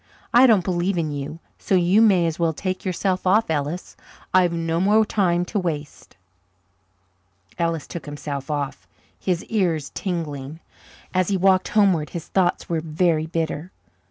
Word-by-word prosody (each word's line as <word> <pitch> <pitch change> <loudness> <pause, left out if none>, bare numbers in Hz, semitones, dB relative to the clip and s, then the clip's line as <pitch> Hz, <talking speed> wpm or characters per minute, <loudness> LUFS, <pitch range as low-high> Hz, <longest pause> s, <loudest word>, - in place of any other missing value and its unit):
I 250 +2 +7
don't 215 -6 +4
believe 180 +1 0
in 160 -3 -1
you, 145 +2 -5 0.2
so 195 - 0
you 185 +4 +4
may 190 -6 +5
as 165 0 -2
well 165 -1 +1
take 185 +3 -4
yourself 185 0 -1
off, 210 -1 +3
Ellis. 150 +4 -3 0.4
I've 180 -2 +4
no 165 0 -1
more 210 +3 +4
time 180 -4 +1
to 205 +3 -2
waste." 155 -5 -5 1.4
Ellis 165 -2 -1
took 170 -3 -8
himself 145 -1 -5
off, 145 -2 -3 0.3
his 180 -2 -1
ears 170 -10 -1
tingling. 155 -5 -4 0.5
As 185 -1 +2
he 200 - +1
walked 185 0 +3
homeward 190 -8 +2
his 170 -3 -7
thoughts 180 -2 +1
were 165 -2 -1
very 160 0 +1
bitter. 165 +1 -3
175 Hz, 155 wpm, -23 LUFS, 155-185 Hz, 1.4 s, I